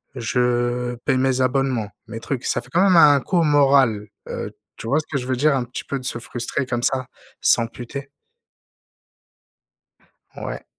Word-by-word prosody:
je 120 Hz, 0 st, 0 dB
paye -, -, +2 dB
mes 130 Hz, 0 st, +1 dB
abonnements, 130 Hz, -4 st, 0 dB, 0.2 s
mes 115 Hz, -, -6 dB
trucs» 125 Hz, +1 st, -4 dB
ça -, -, +1 dB
fait -, -, -8 dB
quand 175 Hz, -, +4 dB
même 185 Hz, -3 st, +5 dB
un 145 Hz, -3 st, +7 dB
coup 180 Hz, -, -1 dB
au 170 Hz, -, +4 dB
moral, 135 Hz, -8 st, +3 dB, 0.2 s
heu, -, -, -5 dB, 0.2 s
tu 115 Hz, -, -8 dB
vois 140 Hz, +5 st, +2 dB
ce 155 Hz, -, -6 dB
que 145 Hz, -, -1 dB
je 125 Hz, -2 st, -5 dB
veux 130 Hz, -1 st, 0 dB
dire? 150 Hz, +1 st, +3 dB
Un 130 Hz, -, 0 dB
petit 120 Hz, +1 st, -7 dB
peu 140 Hz, -, -3 dB
de 130 Hz, -, -9 dB
se 120 Hz, -, -2 dB
frustrer 120 Hz, +3 st, -3 dB
comme 120 Hz, -1 st, -3 dB
ça, 130 Hz, -1 st, 0 dB, 0.3 s
s'amputer. 120 Hz, +4 st, 0 dB, 2.3 s
Ouais. -, -, -6 dB
130 Hz, 180 wpm, -22 LUFS, 120-140 Hz, 2.3 s, un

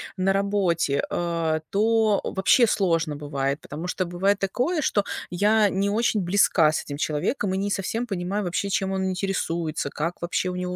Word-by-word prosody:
на 195 Hz, 0 st, +1 dB
работе, 190 Hz, -7 st, +1 dB
а, 165 Hz, -2 st, -1 dB
то 220 Hz, 0 st, +2 dB
вообще 220 Hz, +5 st, +3 dB
сложно 165 Hz, -7 st, +1 dB
бывает. 140 Hz, -1 st, -2 dB
Потому 155 Hz, +5 st, -7 dB
что 185 Hz, 0 st, -1 dB
бывает 190 Hz, +4 st, +1 dB
такое, 250 Hz, -, -1 dB
что 205 Hz, -6 st, +1 dB, 0.3 s
я 210 Hz, +3 st, +3 dB
не 195 Hz, +1 st, 0 dB
очень 215 Hz, -1 st, +1 dB
близка 175 Hz, -3 st, +3 dB
с -, -, -2 dB
этим 145 Hz, -, -6 dB
человеком 160 Hz, -, -1 dB
и 190 Hz, -, -1 dB
не 200 Hz, +1 st, -1 dB
совсем 225 Hz, +5 st, -2 dB
понимаю 195 Hz, 0 st, -2 dB
вообще, 200 Hz, +3 st, -2 dB
чем 190 Hz, 0 st, 0 dB
он 190 Hz, 0 st, -1 dB
интересуется, 170 Hz, -5 st, -2 dB
как 165 Hz, +5 st, -4 dB
вообще 175 Hz, +1 st, -1 dB
у 180 Hz, -, -4 dB
него 180 Hz, 0 st, -3 dB
190 Hz, 175 wpm, -24 LUFS, 170-205 Hz, 0.3 s, вообще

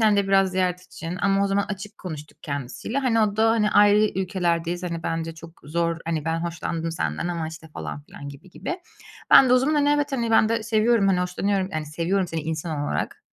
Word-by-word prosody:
hem 215 Hz, -2 st, +4 dB
de 200 Hz, -, +2 dB
biraz 195 Hz, -1 st, +4 dB
ziyaret 180 Hz, -1 st, 0 dB
için 175 Hz, -1 st, -7 dB
ama 195 Hz, 0 st, +3 dB
o -, -, +2 dB
zaman 200 Hz, +1 st, +1 dB
açık 205 Hz, 0 st, -7 dB
konuştuk 155 Hz, -5 st, -8 dB
kendisiyle. 140 Hz, -, -4 dB
Hani, 245 Hz, -4 st, +2 dB
o 210 Hz, -1 st, +1 dB
da, 225 Hz, +1 st, +4 dB
hani, 215 Hz, -2 st, +2 dB
ayrı 205 Hz, +1 st, +5 dB
ülkelerdeyiz, 175 Hz, -2 st, -1 dB
hani, 170 Hz, -2 st, -4 dB
bence 165 Hz, 0 st, -3 dB
çok 165 Hz, +1 st, -13 dB
zor, 165 Hz, +2 st, -1 dB
hani, 160 Hz, -2 st, -1 dB
ben 165 Hz, 0 st, -1 dB
hoşlandım 165 Hz, -1 st, -3 dB
senden 80 Hz, -, -2 dB
ama, 165 Hz, -2 st, -3 dB
işte, 160 Hz, 0 st, -11 dB
falan 150 Hz, -, -6 dB
filan, 140 Hz, -1 st, -10 dB
gibi 140 Hz, +7 st, -14 dB
gibi. 350 Hz, -, -5 dB, 0.5 s
Ben 260 Hz, -, +9 dB
de -, -, +4 dB
o -, -, +6 dB
zaman, 295 Hz, +4 st, +1 dB
hani, 290 Hz, -1 st, +3 dB
evet, 290 Hz, -1 st, +1 dB
hani, 235 Hz, -3 st, -1 dB
ben 220 Hz, -1 st, +5 dB
de 230 Hz, -1 st, 0 dB
seviyorum, 220 Hz, -2 st, +3 dB
hani, 180 Hz, -2 st, +2 dB
hoşlanıyorum. 190 Hz, +2 st, -1 dB
Yani, 155 Hz, -1 st, -3 dB
seviyorum 175 Hz, +5 st, 0 dB
seni 165 Hz, -1 st, -3 dB
insan 160 Hz, -1 st, -3 dB
olarak, -, -, -2 dB
180 Hz, 215 wpm, -24 LUFS, 165-210 Hz, 0.5 s, Ben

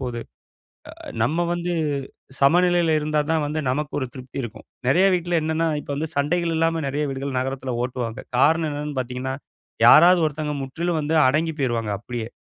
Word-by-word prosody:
போது. 120 Hz, -3 st, -4 dB, 0.7 s
அ -, -, -20 dB, 0.2 s
நம்ம 165 Hz, +7 st, +1 dB
வந்து 175 Hz, 0 st, -2 dB, 0.7 s
சமநிலையில 175 Hz, +2 st, +4 dB
இருந்தா 150 Hz, 0 st, 0 dB
தான் 160 Hz, -2 st, +1 dB
வந்து 155 Hz, +1 st, -2 dB
நமக்கு 145 Hz, +3 st, -2 dB
ஒரு 130 Hz, -, -2 dB
திருப்தி 130 Hz, +1 st, -6 dB
இருக்கும். 115 Hz, -1 st, -9 dB, 0.2 s
நறைய 185 Hz, +8 st, +5 dB
வீட்ல 175 Hz, -1 st, 0 dB
என்னன்னா 160 Hz, +1 st, 0 dB
இப்ப -, -, -8 dB
வந்து 155 Hz, +2 st, -3 dB
சண்டைகள் 165 Hz, +3 st, +1 dB
இல்லாம 165 Hz, 0 st, +1 dB
நெறைய 145 Hz, +2 st, -1 dB
வீடுகள் 135 Hz, -1 st, -4 dB
நகரத்தில 130 Hz, -1 st, -3 dB
ஓட்டுவாங்க. 125 Hz, -2 st, -4 dB, 0.2 s
காரணம் 160 Hz, +3 st, +3 dB
என்னன்னு 145 Hz, -1 st, -5 dB
பார்த்தீங்கன்னா, 130 Hz, +1 st, -4 dB, 0.5 s
யாராவது 180 Hz, +1 st, +8 dB
ஒருத்தங்க 150 Hz, 0 st, -4 dB
முற்றிலும் 165 Hz, +5 st, -2 dB
வந்து 155 Hz, +2 st, -1 dB
அடங்கிப் 160 Hz, +3 st, 0 dB
போயிருவாங்க 115 Hz, -4 st, -1 dB
அப்டியே. 120 Hz, -1 st, -5 dB
150 Hz, 160 wpm, -23 LUFS, 130-165 Hz, 0.7 s, யாராவது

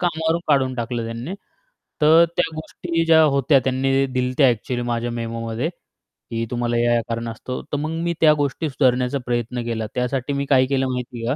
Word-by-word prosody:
कामावरून 165 Hz, -1 st, 0 dB
काढून 135 Hz, -3 st, +2 dB
टाकलं 120 Hz, -1 st, -3 dB
त्यांनी. 115 Hz, +11 st, -5 dB, 0.7 s
तर 160 Hz, +2 st, +7 dB
त्या -, -, +1 dB
गोष्टी 165 Hz, +1 st, -3 dB
ज्या 160 Hz, -1 st, +6 dB
होत्या 140 Hz, -1 st, +4 dB
त्यांनी 135 Hz, +1 st, 0 dB
ते 135 Hz, 0 st, +3 dB
दिलं 125 Hz, -1 st, 0 dB
होतं 130 Hz, +3 st, +2 dB
ॲक्युअली 120 Hz, 0 st, +1 dB
माझ्या 120 Hz, 0 st, -1 dB
मेमोमध्ये 115 Hz, +3 st, -3 dB, 0.6 s
की 115 Hz, 0 st, -2 dB
तुम्हाला 120 Hz, -1 st, -1 dB
या-या 120 Hz, 0 st, +2 dB
कारणास्तो 115 Hz, +2 st, -4 dB
तर 145 Hz, -, 0 dB
मग 150 Hz, +2 st, -2 dB
मी 170 Hz, -, 0 dB
त्या 155 Hz, -2 st, +7 dB
गोष्टी 150 Hz, +2 st, -1 dB
सुधारण्याचा 130 Hz, -1 st, +1 dB
प्रयत्न 120 Hz, 0 st, -2 dB
केला. 115 Hz, -1 st, -2 dB
त्यासाठी 125 Hz, +2 st, -1 dB
मी 140 Hz, 0 st, -1 dB
काय 130 Hz, -2 st, +5 dB
केलं 135 Hz, -1 st, 0 dB
माहिती 125 Hz, -2 st, -5 dB
आहे 130 Hz, -, +1 dB
130 Hz, 180 wpm, -22 LUFS, 120-145 Hz, 0.7 s, तर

